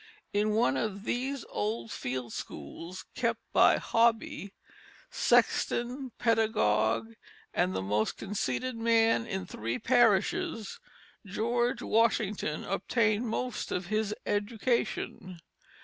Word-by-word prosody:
In 210 +1 +2
one 210 - +2
of 200 +6 -2
these 260 +3 -2
old 215 +1 -2
field 125 -2 -4
schools 165 - -7
kept - - 0
by - - +6
Hobby 230 +1 +1 0.6
sexton, 250 +2 +1
pedagogue, 115 - +2 0.4
and 95 +1 +1
"the 95 - -1
most 105 +3 0
conceited 205 - -2
man 230 0 +3
in 190 -4 -3
three 115 -7 -3
parishes" 230 - +2 0.4
George 235 +4 0
Washington 215 -8 +1
obtained 215 +3 +1
most 250 +3 -3
of 180 - -2
his 215 -1 0
education. 205 -3 -1
215 Hz, 100 wpm, -30 LUFS, 180-235 Hz, 0.6 s, by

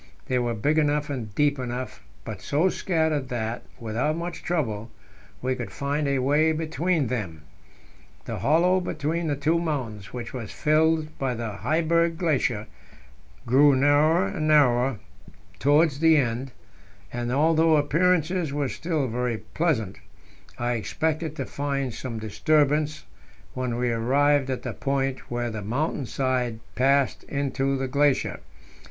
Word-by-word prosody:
They 130 -1 0
were 120 -1 -1
big 145 +9 +2
enough 150 -1 +1
and 110 -7 -5
deep 145 +1 +2
enough, 125 0 -5 0.2
but - - -6
so 160 +6 +2
scattered 160 -8 0
that, 115 -1 -3 0.2
without 120 +8 -1
much 170 0 -5
trouble, 115 -11 -2 0.5
we 130 0 +1
could 125 -2 -5
find 145 +1 -2
a 140 -1 +1
way 145 +5 +3
between 160 0 0
them. 100 -11 -4 0.8
The - - -4
hollow 175 +5 +3
between 165 -1 -2
the 145 - 0
two 155 +4 +1
mountains, 125 - -4
which 120 -2 -6
was 115 -6 -6
filled 155 0 +1
by 130 -2 -1
the 115 -1 -4
Heiberg 165 +3 +1
Glacier, 135 - 0 0.8
grew 140 +4 +5
narrower 145 0 +4
and 155 +10 -2
narrower 130 -5 +4 0.6
towards 145 - +3
the 160 0 +5
end, 125 0 -1 0.6
and, 120 0 -2
although 160 +3 +4
appearances 165 +2 +1
were 145 -2 -1
still 160 -4 -2
very 120 0 -1 0.2
pleasant, 115 - 0 0.6
I 120 -1 -1
expected 155 - -2
to - - -3
find 140 -3 -2
some 120 -2 -5
disturbance 150 +6 +1 0.5
when 125 -2 -2
we 125 0 0
arrived 135 +4 +2
at 130 - -3
the - - -4
point 135 -1 -2
where 120 -1 -2
the 110 -1 -5
mountain 130 +5 -2
side 125 -4 -1
passed 135 +1 +2
into 135 -1 -1
the 135 0 -2
glacier. 140 +1 +1
140 Hz, 140 wpm, -25 LUFS, 125-155 Hz, 0.8 s, grew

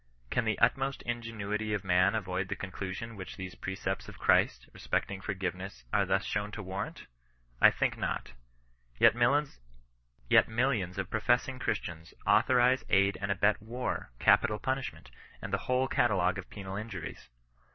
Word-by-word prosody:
Can 125 - +1
the 110 - +1
utmost 135 +3 +1
ingenuity 110 -3 -2
of 105 - -4
man 90 +2 +3
avoid 95 -3 -2
the - - -3
conclusion 95 +4 -6
which 95 -2 -8
these 95 -1 -6
precepts 95 0 -4
of - - -11
Christ, - - +2
respecting 95 -1 -2
forgiveness, 95 - -4
are - - +3
thus 95 0 +1
shown 105 0 -1
to 110 - -5
warrant! 95 +1 -5 0.6
I - - +10
think - - -1
not. - - -2 0.7
Yet - - +7
millions 90 - 0
of 95 -2 -3
professing 120 +4 +1
Christians, 85 -9 -4
authorize, 125 +1 +4
aid, 100 0 +3
and 100 0 -1
abet 105 +2 +2
war, 120 +3 -4
capital 105 - +4
punishment, 130 +2 -4 0.3
and - - -7
the - - +2
whole 130 +1 +3
catalogue 95 -7 +2
of 95 - -9
penal 95 -2 -7
injuries. 105 - -7
100 Hz, 145 wpm, -31 LUFS, 95-120 Hz, 0.7 s, I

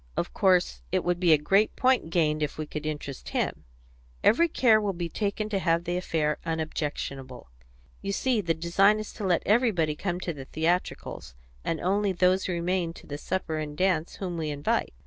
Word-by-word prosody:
"Of - - -2
course. 180 - +2
It - - +1
would 175 0 0
be 175 -2 +4
a 155 - +7
great 195 +8 +2
point 255 -9 +2
gained 155 -3 +1
if 150 -1 -2
we 155 - -3
could 150 +1 -5
interest 145 -3 -5
him. - - -2 0.6
Every 335 +10 +5
care 230 -8 +4
will 205 -2 -1
be 170 -1 -4
taken 210 +3 -2
to 200 -2 0
have 170 -2 +1
the 175 0 -2
affair 160 -4 0
unobjectionable. 145 - -4 0.5
You 200 - -3
see, 240 +2 +1
the 165 -3 0
design 195 +6 +3
is 215 -1 -6
to 215 - -7
let 180 -3 +2
everybody 200 -9 +2
come 175 +2 -3
to 170 - -3
the 135 -3 -9
theatricals, 160 - -2 0.3
and 165 - -1
only 195 +2 +1
those 185 +1 +2
remain 175 -1 -1
to - - -14
the 145 0 -6
supper 165 -3 -2
and 150 -1 -5
dance 180 -4 +1
whom 180 -3 -4
we 155 -1 -2
invite. 145 0 -1
175 Hz, 190 wpm, -27 LUFS, 155-195 Hz, 0.6 s, a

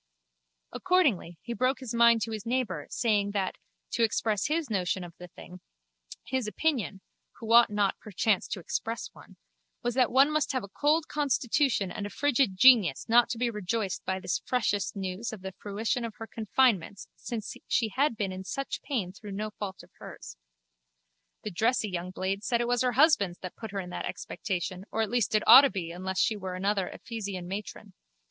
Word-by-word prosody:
Accordingly 260 - +1
he 235 - -4
broke 255 +3 0
his 255 -3 -6
mind 235 -1 +5
to 225 - -4
his 215 -2 -5
neighbour, 230 - -2
saying 210 -4 +1
that, 195 -2 -2 0.3
to - - -1
express 215 -2 +1
his 310 0 -1
notion 190 -4 -1
of 175 -1 -10
the 180 - -9
thing, 180 +1 -13 0.6
his 260 -4 -2
opinion 220 -6 -1 0.3
(who 230 0 -3
ought 235 0 +8
not 205 -2 0
perchance 210 -1 0
to - - -4
express 225 +5 -4
one) - - -16 0.5
was 240 - 0
that 250 -1 +2
one 275 +3 +5
must 305 -2 0
have 255 - -1
a - - -7
cold 300 +8 +1
constitution 270 -7 +1
and 205 - -4
a - - -8
frigid 265 -5 +1
genius 215 - +6
not 235 +1 +5
to 235 - -3
be 240 0 0
rejoiced 210 -1 -2
by 190 0 -2
this 185 - -2
freshest 215 -4 0
news 195 +3 -4
of 215 -4 -8
the 190 - -5
fruition 220 +4 -2
of 230 -2 -5
her 225 - -7
confinement 220 -4 +1
since 225 -3 -6
she 225 -2 +1
had 260 +2 0
been 200 -3 -1
in 185 0 -6
such 275 +8 -4
pain 205 -10 -3
through 205 0 -9
no 215 +2 -4
fault 200 -2 -7
of - - -19
hers. - - -10 1.1
The 210 - -4
dressy 220 +3 +1
young 180 0 -4
blade 190 +2 -3
said 235 +1 +1
it 240 - 0
was 245 0 +1
her 250 -1 +1
husband's 250 - +4
that 185 - -6
put 220 - -7
her 195 0 -4
in 180 -2 -6
that - - -4
expectation 180 0 -4
or 225 - 0
at 220 - -4
least 240 -3 +1
it 215 - +3
ought 250 +4 +12
to 280 - +3
be 175 -7 -4
unless 185 +2 -5
she 215 - +2
were 190 -3 -5
another 195 0 0
Ephesian 200 -6 -6
matron. 200 +3 -7
215 Hz, 195 wpm, -28 LUFS, 190-245 Hz, 1.1 s, ought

